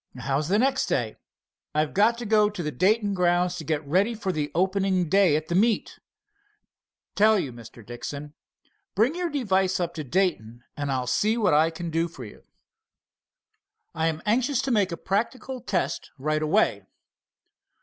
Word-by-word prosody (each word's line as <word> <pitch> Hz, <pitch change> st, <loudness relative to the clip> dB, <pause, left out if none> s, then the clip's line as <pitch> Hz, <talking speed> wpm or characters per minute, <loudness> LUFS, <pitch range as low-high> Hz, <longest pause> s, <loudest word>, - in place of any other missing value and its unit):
"How's 135 Hz, +3 st, -1 dB
the 195 Hz, +4 st, +2 dB
next 265 Hz, +3 st, +1 dB
day?" 115 Hz, -4 st, -1 dB, 0.6 s
"I've 155 Hz, -1 st, 0 dB
got 220 Hz, +4 st, +3 dB
to 240 Hz, -, -6 dB
go 210 Hz, -1 st, +4 dB
to 205 Hz, -4 st, -6 dB
the 150 Hz, -, -2 dB
Dayton 205 Hz, -, +1 dB
grounds 180 Hz, -1 st, +1 dB
to 160 Hz, -, -6 dB
get 155 Hz, -1 st, -2 dB
ready 190 Hz, +10 st, +1 dB
for 200 Hz, -3 st, -2 dB
the 150 Hz, -4 st, -2 dB
opening 190 Hz, -1 st, +1 dB
day 195 Hz, -5 st, +4 dB
at 155 Hz, +1 st, -2 dB
that 170 Hz, -, -3 dB
meet. 215 Hz, +4 st, +1 dB, 1.1 s
Tell 215 Hz, +1 st, +4 dB
you, 140 Hz, -10 st, -3 dB
Mr. 115 Hz, -1 st, -13 dB
Dixon, 140 Hz, +5 st, -7 dB, 0.6 s
bring 225 Hz, +9 st, +3 dB
your 350 Hz, 0 st, -2 dB
device 195 Hz, -, 0 dB
up 175 Hz, -1 st, -2 dB
to 155 Hz, -, -5 dB
Dayton, 125 Hz, -, -1 dB
and 145 Hz, -1 st, -3 dB
I'll 130 Hz, -1 st, -1 dB
see 210 Hz, -, +1 dB
what 215 Hz, -8 st, +2 dB
I 155 Hz, +2 st, +4 dB
can 165 Hz, 0 st, -6 dB
do 165 Hz, +1 st, 0 dB
for 135 Hz, -7 st, -10 dB
you." 105 Hz, -, -13 dB, 1.5 s
"I 160 Hz, +1 st, 0 dB
am 160 Hz, -1 st, -3 dB
anxious 245 Hz, +5 st, +1 dB
to 270 Hz, -, -1 dB
make 205 Hz, -5 st, +2 dB
a 170 Hz, -, -4 dB
practical 240 Hz, +8 st, -3 dB
test 170 Hz, -6 st, -2 dB
right 155 Hz, +3 st, -1 dB
away." 155 Hz, 0 st, +1 dB
180 Hz, 170 wpm, -25 LUFS, 150-210 Hz, 1.5 s, go